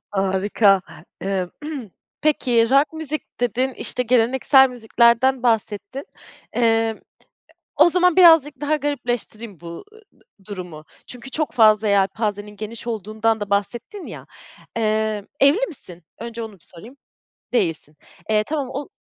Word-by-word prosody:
Harika. 195 0 +2 0.4
Emm, 190 -2 -2 0.7
peki, 250 -6 +2
rock 280 +3 +3
müzik 310 -4 -6
dedin, 245 +3 0
işte 250 - -2
geleneksel 255 +3 +4
müziklerden 240 +2 +2
bahsettin. 225 +2 -1 0.5
Emm, 225 -2 +1 0.8
o - - +6
zaman 360 -1 +3
birazcık 325 -6 +6
daha 295 +1 +1
garipleştireyim 240 - -4
bu, 170 - -11
ı 285 - -10
ııı, 440 - -17 0.5
durumu 180 -6 -8 0.2
çünkü 250 +1 -10
çok 310 -1 -2
fazla 215 -2 +4
yelpazenin 205 +1 0
geniş 220 +3 -7
olduğundan 220 +1 -1
da 205 -1 -5
bahsettin 240 - -3
ya, - - -9 0.5
eee, 215 -2 0
"Evli 320 - +4
misin?" 180 - -11 0.2
Önce 230 0 -6
onu 220 - -8
bir 185 - -16
sorayım. 225 +10 -13 0.6
Değilsin. 165 -9 -1 0.3
Eee, 215 -1 +2
tamam 285 0 -3
o 280 +1 -6
230 Hz, 125 wpm, -21 LUFS, 205-265 Hz, 0.8 s, o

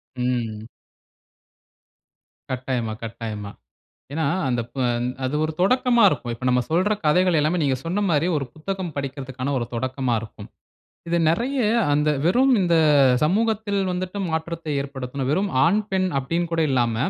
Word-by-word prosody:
ம். 120 -3 -2 1.8
கட்டாயமா, 125 -3 -2
கட்டாயமா. 110 -2 -6 0.6
ஏன்னா, 160 0 -1 0.2
அந்த 120 -1 0
ப - - -18 0.5
அது 130 - -1
ஒரு 155 - -2
தொடக்கமா 245 +4 +3
இருக்கும். 125 -7 -2
இப்ப 120 - -9
நம்ம 125 0 +3
சொல்ற 185 +6 +2
கதைகள் 180 +2 +3
எல்லாமே 155 +4 +1
நீங்க 135 -2 +1
சொன்ன 180 +5 -1
மாதிரி 155 +1 +2
ஒரு 140 - -1
புத்தகம் 180 +1 -4
படிக்கிறதுக்கான 135 -1 -4
ஒரு 120 - -3
தொடக்கமா 130 0 -1
இருக்கும். 105 -2 -10 0.6
இது 170 - +2
நெறைய 240 - +1 0.3
அந்த 150 +1 +2 0.2
வெறும் 255 +9 +4
இந்த 170 -2 +2 0.5
சமூகத்தில 210 +3 +1 0.2
வந்துட்டு 185 +2 -4
மாற்றத்தை 160 0 -3
ஏற்படுத்தணும். 135 -1 -4
வெறும் 195 +5 +1 0.2
ஆண், 190 +6 +3
பெண் 190 -1 +1
அப்படின்னு 165 +6 -1
கூட 165 - +1
இல்லாம 120 -3 +1
150 Hz, 135 wpm, -23 LUFS, 125-180 Hz, 1.8 s, வெறும்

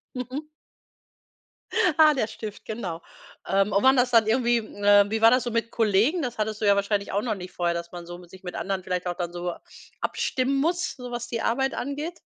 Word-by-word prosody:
Mhm. 260 +5 -5 1.5
Ah, 310 -1 +7
der 240 -6 0
Stift, 215 -1 -8
genau. 185 -7 -5 0.5
Ähm, 195 +2 +2
und 200 - +2
waren 265 0 +6
das 245 0 +3
dann 225 -2 +5
irgendwie, 240 +1 +3
äh 205 -2 +4
wie 220 0 -1
war 225 +1 +7
das 255 0 +3
so 240 - -3
mit 230 0 -1
Kollegen? 225 - +2
Das 245 -4 -4
hattest 215 0 -2
du - - +1
ja 200 0 +5
wahrscheinlich 200 0 -1
auch 200 +2 0
noch 220 -3 -1
nicht 180 -1 -9
vorher, 175 -1 0
dass 170 0 -5
man 175 -1 -8
so 175 0 -8
mit 175 -1 -15
sich 190 0 -14
mit 180 - -6
anderen 190 -1 -3
vielleicht 180 -1 -3
auch 175 - -1
dann 175 -1 -4
so 175 0 -3 0.5
abstimmen 260 +1 0
muss, 345 +3 0
so 250 -2 -8
was 240 0 -4
die 230 -2 -3
Arbeit 265 +3 0
angeht? 295 +6 -4
220 Hz, 220 wpm, -25 LUFS, 190-250 Hz, 1.5 s, Ah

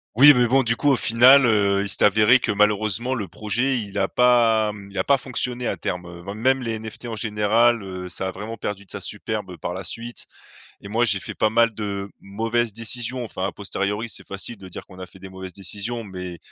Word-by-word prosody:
Oui 145 +4 +9
mais 125 0 +4
bon 135 +3 +4
du 115 -2 0
coup, 145 - +1
au - - +4
final, 125 +3 +6
heu, 100 -2 +3
il 100 - -2
s'est - - +2
avéré 110 +5 +5
que - - -1
malheureusement 105 +4 +1
le 100 -5 -4
projet, 120 +4 -1
il 100 -2 -7
a 95 - +2
pas, 115 -3 +3
mmh, 100 -1 -11
il - - -9
a - - +2
pas 140 -1 +3
fonctionné 125 -1 -3
à - - -1
terme, 90 0 -4 0.2
hem. 100 +2 -5
Même 130 +3 +2
les 115 -2 -3
NFT 110 +2 -9
en 115 - -4
général, 110 +2 +2
heu, 90 -1 -7
ça 95 +2 -3
a - - -3
vraiment 105 +4 -7
perdu 100 -1 -5
de - - -14
sa - - -5
superbe, - - -4
heu, 90 - -9
par 90 - -4
la 95 +1 -6
suite 115 +6 -7 0.5
et 100 - -10
moi, 115 +3 +1
j'ai 100 -4 +1
fait - - -7
pas 110 - +1
mal 115 -1 +3
de 100 -2 -4
mauvaises 115 +3 -1
décisions. 120 +3 -3
Enfin, 95 -4 -4
à - - -6
posteriori, 105 +2 -3
c'est - - -8
facile 100 +4 -5
de 95 -1 -12
dire - - -9
qu'on 95 -1 -15
a 90 - -7
fait 95 - -17
des 95 - -10
mauvaises 95 -1 -9
décisions, 105 +4 -5
mais 90 -3 -7
110 Hz, 240 wpm, -23 LUFS, 100-120 Hz, 0.5 s, Oui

